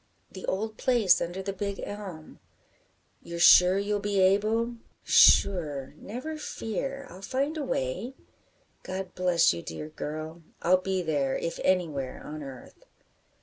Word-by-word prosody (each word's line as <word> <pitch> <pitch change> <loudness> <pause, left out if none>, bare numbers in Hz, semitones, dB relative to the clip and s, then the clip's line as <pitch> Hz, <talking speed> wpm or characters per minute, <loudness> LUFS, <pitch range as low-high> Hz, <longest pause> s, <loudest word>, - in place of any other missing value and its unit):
"The 190 - -8
old 215 +3 -2
place 230 -8 +3
under 175 +3 -4
the 195 0 -3
big 200 0 -4
elm." 190 -7 -8 0.8
"You're 170 0 -7
sure 180 +2 +7
you'll 205 +1 -1
be 200 -1 -1
able?" 215 +5 +2 0.3
"Sure, 150 -9 +4
never 265 +9 -7
fear, 275 +2 -4
I'll 185 - -11
find 275 +8 -2
a 310 - -3
way." 205 - -3 0.7
"God 190 0 -6
bless 180 - +3
you, 85 - -6
dear 85 - -7
girl. 155 +2 -6 0.2
I'll 185 +2 +4
be 190 -1 -1
there, 145 -4 0
if 165 - -4
anywhere 155 -8 0
on 155 +1 -7
earth." 135 -3 -11
185 Hz, 140 wpm, -28 LUFS, 160-210 Hz, 0.8 s, sure